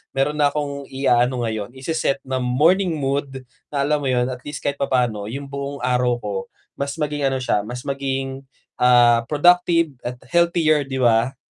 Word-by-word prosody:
meron 140 Hz, +3 st, +1 dB
na 145 Hz, -, +5 dB
akong 140 Hz, -2 st, -4 dB
iaano 125 Hz, -2 st, +1 dB
ngayon, 110 Hz, 0 st, -4 dB
ise-set 140 Hz, 0 st, -1 dB
na 130 Hz, -1 st, -1 dB
morning 160 Hz, +8 st, +2 dB
mood 135 Hz, -2 st, -2 dB, 0.3 s
na 140 Hz, -1 st, 0 dB
alam 150 Hz, +1 st, +1 dB
mo -, -, -1 dB
yun, 125 Hz, -1 st, +1 dB
at 125 Hz, -1 st, -5 dB
least 145 Hz, -, -6 dB
kahit 140 Hz, -, -1 dB
papa'no 120 Hz, -7 st, 0 dB
yung 140 Hz, +2 st, -6 dB
buong 140 Hz, 0 st, -5 dB
araw 125 Hz, -1 st, +1 dB
ko 100 Hz, -4 st, -4 dB, 0.3 s
mas 140 Hz, +1 st, -3 dB
maging 150 Hz, -1 st, -2 dB
ano 135 Hz, -1 st, -1 dB
siya, 105 Hz, -5 st, 0 dB
mas 125 Hz, +3 st, -7 dB
maging, 135 Hz, -1 st, -3 dB, 0.4 s
ah, 120 Hz, -1 st, +5 dB
productive 165 Hz, -1 st, +3 dB
at 125 Hz, +1 st, -4 dB, 0.2 s
healthier 170 Hz, -3 st, +3 dB
'di 130 Hz, -1 st, -3 dB
ba? 120 Hz, +1 st, +3 dB
135 Hz, 170 wpm, -21 LUFS, 125-145 Hz, 0.4 s, na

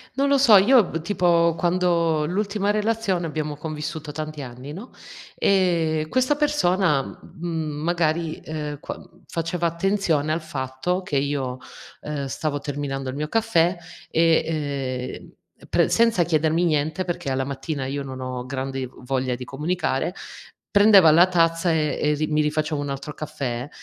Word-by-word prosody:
Non 275 Hz, +1 st, +2 dB
lo 280 Hz, 0 st, +4 dB
so. 235 Hz, -6 st, +7 dB
Io 235 Hz, +4 st, +6 dB
b 165 Hz, -2 st, -4 dB
tipo, 170 Hz, -2 st, +2 dB
quando 170 Hz, -3 st, +1 dB
l'ultima 200 Hz, +3 st, -1 dB
relazione 210 Hz, -4 st, 0 dB
abbiamo 150 Hz, -2 st, -3 dB
convissuto 155 Hz, 0 st, -5 dB
tanti 155 Hz, -1 st, -5 dB
anni, 125 Hz, +2 st, -8 dB
no. 200 Hz, +10 st, -9 dB, 0.5 s
Ehm, 165 Hz, -5 st, +2 dB
questa 255 Hz, -, +2 dB
persona, 190 Hz, -, +2 dB
mh -, -, -10 dB, 0.3 s
mhmm, 160 Hz, -2 st, -2 dB
magari, 165 Hz, -1 st, 0 dB
ehm, 150 Hz, -2 st, -5 dB
quan -, -, -8 dB, 0.2 s
faceva 170 Hz, +1 st, -2 dB
attenzione 170 Hz, -3 st, 0 dB
al 160 Hz, -, -1 dB
fatto 145 Hz, +5 st, -3 dB
che 155 Hz, -6 st, -3 dB
io, 135 Hz, -2 st, -1 dB, 0.4 s
ehm, 145 Hz, -2 st, -4 dB
stavo 145 Hz, +2 st, -2 dB
terminando 135 Hz, -2 st, -4 dB
il 130 Hz, -, -7 dB
mio 150 Hz, +1 st, -3 dB
caffè, 185 Hz, -4 st, +2 dB, 0.3 s
e, 165 Hz, 0 st, +3 dB, 0.7 s
ehm, -, -, -20 dB
pre -, -, +3 dB
senza 230 Hz, -6 st, +3 dB
chiedermi 160 Hz, +1 st, +1 dB
niente 155 Hz, +2 st, 0 dB
perché 175 Hz, -5 st, -3 dB
alla 135 Hz, 0 st, 0 dB
mattina 140 Hz, +1 st, -4 dB
io 140 Hz, +2 st, -3 dB
non 130 Hz, -1 st, -7 dB
ho 125 Hz, -1 st, -5 dB
grandi 135 Hz, -1 st, -4 dB, 0.2 s
voglia 130 Hz, -1 st, -1 dB
di 125 Hz, +1 st, -6 dB
comunicare, 150 Hz, +3 st, -2 dB, 0.6 s
prendeva 200 Hz, -5 st, +7 dB
la 170 Hz, +4 st, +7 dB
tazza 165 Hz, -1 st, +2 dB
e 155 Hz, -2 st, 0 dB
e 150 Hz, 0 st, +2 dB
ri 155 Hz, +1 st, -1 dB
mi 155 Hz, 0 st, +1 dB
rifaceva 150 Hz, 0 st, -1 dB
un 145 Hz, -, -4 dB
altro 140 Hz, +2 st, -5 dB
caffè. 140 Hz, -4 st, -4 dB
160 Hz, 155 wpm, -23 LUFS, 145-180 Hz, 0.7 s, so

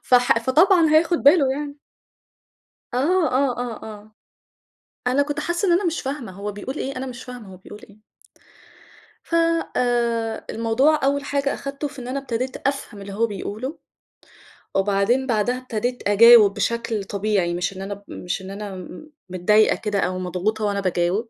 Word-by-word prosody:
فح 245 Hz, -2 st, +4 dB
فطبعًا 320 Hz, -, +4 dB
هياخد 330 Hz, +2 st, +3 dB
بالُه 285 Hz, -1 st, +5 dB
يعني. 285 Hz, +1 st, -5 dB, 1.2 s
آه، 320 Hz, +5 st, +2 dB
آه، 260 Hz, -1 st, +1 dB
آه، 240 Hz, -3 st, -5 dB
آه. 215 Hz, 0 st, -10 dB, 1.0 s
أنا 260 Hz, +3 st, +3 dB
كُنت 290 Hz, +1 st, -4 dB
حاسّة 345 Hz, +5 st, -1 dB
إن -, -, +3 dB
أنا 360 Hz, +3 st, +2 dB
مش 335 Hz, -1 st, -1 dB
فاهمة 265 Hz, -6 st, -5 dB
هو 200 Hz, +2 st, -5 dB
بيقول 230 Hz, +7 st, -6 dB
إيه، 275 Hz, -, -4 dB
أنا 265 Hz, -, -4 dB
مش 250 Hz, -1 st, -8 dB
فاهمة 240 Hz, -6 st, -10 dB
هو -, -, -12 dB
بيقول 205 Hz, +3 st, -12 dB
إيه. 210 Hz, +1 st, -20 dB, 1.2 s
ف -, -, -6 dB, 0.4 s
آآ، 235 Hz, -2 st, 0 dB
الموضوع 260 Hz, +7 st, +2 dB
أوّل 280 Hz, +1 st, +1 dB
حاجة 280 Hz, -1 st, -1 dB
أخدته 280 Hz, +1 st, -5 dB
في 280 Hz, -1 st, -15 dB
إن 245 Hz, -, -7 dB
أنا 275 Hz, +2 st, -2 dB
أبتديت 255 Hz, -1 st, -3 dB
أفهم 275 Hz, -7 st, -3 dB
اللي 200 Hz, 0 st, -8 dB
هو 230 Hz, +4 st, +1 dB
بيقوله، 215 Hz, -, -6 dB, 1.0 s
وبعدين 205 Hz, +7 st, +1 dB
بعدها 240 Hz, +1 st, +1 dB
أبتدِيت 245 Hz, -2 st, -3 dB
أجاوب 215 Hz, 0 st, +7 dB
بشكل 230 Hz, -1 st, -2 dB
طبيعي، 195 Hz, -3 st, -1 dB
مش 175 Hz, +2 st, -2 dB
إن -, -, -6 dB
أنا 195 Hz, +1 st, -4 dB
ب 200 Hz, -, -13 dB
مش 180 Hz, +2 st, -4 dB
إنّ 190 Hz, +1 st, -8 dB
أنا 200 Hz, -1 st, -6 dB
م 185 Hz, -, -10 dB, 0.2 s
متضايقة 210 Hz, +4 st, +3 dB
كده 210 Hz, -2 st, -2 dB
أو 185 Hz, -1 st, -1 dB
مضغوطة 185 Hz, +4 st, -2 dB
وأنا 200 Hz, -1 st, 0 dB
باجاوب. 185 Hz, +4 st, 0 dB
235 Hz, 165 wpm, -22 LUFS, 205-275 Hz, 1.2 s, أجاوب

